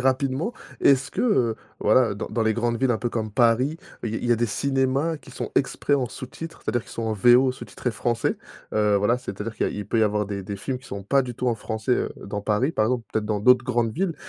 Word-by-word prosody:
rapidement, 135 - +1 0.3
est-ce 135 -1 +4
que, - - -3
heu, 125 - +2 0.2
voilà 110 0 +4
dans 100 - -5
dans 115 - -1
les 110 0 +2
grandes 120 0 0
villes 130 -1 +3
un 115 - +1
peu 120 - -1
comme 110 -2 -2
Paris 120 +6 +3 0.3
il 115 - -2
y - - -3
a - - -1
il - - -7
y 120 - +4
a 120 - +3
des 120 - +1
cinémas 135 +7 0
qui 145 - -15
sont - - -5
exprès 140 +1 +1
en 135 -3 +1
sous-titre, 130 +7 -8
c'est-à-dire 120 +2 0
qu'ils - - -16
sont 115 - -5
en 110 - 0
VO 125 +5 +5
sous-titrés 125 -1 -5
français? 115 +1 0 0.4
Heu, 105 -1 +3
voilà, 105 +4 +2
c'est-à-dire 110 -2 -6
qu'il - - 0
y - - +1
a - - -6
il 105 -1 -5
peut 115 - +1
y - - +4
avoir 105 -1 +1
des 100 -1 -4
des 100 +2 -5
films 130 +6 -3
qui 130 - -16
sont 100 0 -6
pas 135 +7 +3
du 125 -1 -6
tout 125 - -3
en 120 - +2
français, 110 +2 -2
heu, - - 0
dans 100 +1 -4
Paris, 105 +8 +1
par 110 -6 +2
exemple, 125 -1 -1
peut-être 110 -1 -1
dans 105 -1 0
d'autres 125 +2 +5
grandes 120 -3 0
villes. 175 - -1
120 Hz, 270 wpm, -24 LUFS, 110-130 Hz, 0.4 s, VO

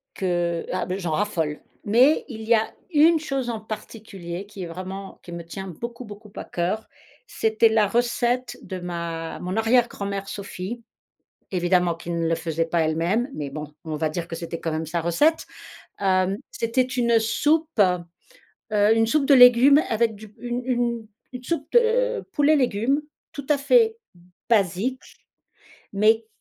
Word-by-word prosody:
que, 175 -2 -1
ah 185 - -1
bah, 185 +1 -3
j'en 175 -4 -3
raffole. 160 -4 -1 0.2
Mais 245 +8 +4
il 225 -5 -8
y 230 +2 +3
a 220 -1 +1 0.2
une 320 +1 +5
chose 275 -5 -3
en 225 -2 -4
particulier 200 -4 -7
qui 200 -2 -9
est - - -4
vraiment 190 +3 -7
qui 175 - -11
me 170 -1 -7
tient 190 +3 -7
beaucoup 235 +8 -7
beaucoup 210 -1 -12
à - - -5
cœur, 185 +6 -2 0.4
c'était 220 +1 +2
la 220 -2 +3
recette 240 +2 0
de 185 -1 -6
ma 170 -2 -5
mon 180 +1 -4
arrière 230 +2 +3
grand-mère 200 -2 -5
Sophie, 200 +4 -6 0.7
évidemment 180 -1 +2
qui 165 - -12
ne 170 -1 -1
le 165 - +2
faisait 165 0 -2
pas 165 +1 0
elle-même, 165 +10 +1
mais 145 -2 -4
bon, 150 +1 -7
on 155 -1 -4
va 155 +1 0
dire 170 +2 -4
que 165 - -6
c'était 165 0 -5
quand 165 - -3
même 160 +1 -2
sa 165 +2 -2
recette. 290 - +2 0.6
Hem, 185 0 +2 0.2
c'était 230 +3 0
une 245 -2 +2
soupe, 295 +5 +1
heu, 180 -3 +1 0.7
une 225 0 +3
soupe 285 +4 +2
de 280 - +5
légumes 250 +3 +8
avec 225 -1 +1
du 210 0 -13
une 245 0 -3
une 240 -3 -1 0.3
une 250 0 -7
soupe 295 +1 -3
de 485 +1 +3
poulet 295 0 +3
légumes 260 +2 +1 0.3
tout 285 -2 -7
à 295 - +4
fait 445 - +3 0.5
basique, 215 +4 +1 0.9
mais 220 +2 +3
210 Hz, 165 wpm, -24 LUFS, 175-245 Hz, 0.9 s, légumes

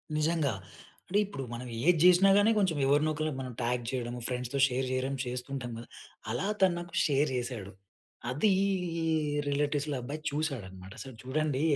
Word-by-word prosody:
నిజంగా. 155 -4 +1 0.5
అంటే, 200 +2 +2
ఇప్పుడు 165 -9 -6
మనం 125 +2 -6 0.2
ఏది 175 -3 +5
జెసినా 180 +2 +7
గాని, 205 +2 +5
కొంచెం 180 -6 +1
ఎవరినో 145 +3 +3
ఒకల్ని 155 0 -2
మనం 130 -1 -5
ట్యాగ్ 120 +1 0
చేయడము, 120 -1 -3
ఫ్రెండ్స్‌తో 125 +2 -2
షేర్ 130 0 -1
చేయడం 130 +1 -1
చేస్తుంటాం 125 0 -4
కదా! 115 - -9 0.4
అలా 125 - -1
తను 190 -2 +5
నాకు 175 0 -9
షేర్ 145 0 +2
చేశాడు. 120 -6 -4 0.6
అదీ 150 +12 +2 1.0
రిలేటివ్స్‌ల 145 0 0
అబ్బాయి 145 +5 -5
చూసాడన్నమాట. 100 - -4
అసలు 130 -3 -8
చూడండి, 140 +1 0
140 Hz, 150 wpm, -30 LUFS, 125-155 Hz, 1.0 s, జెసినా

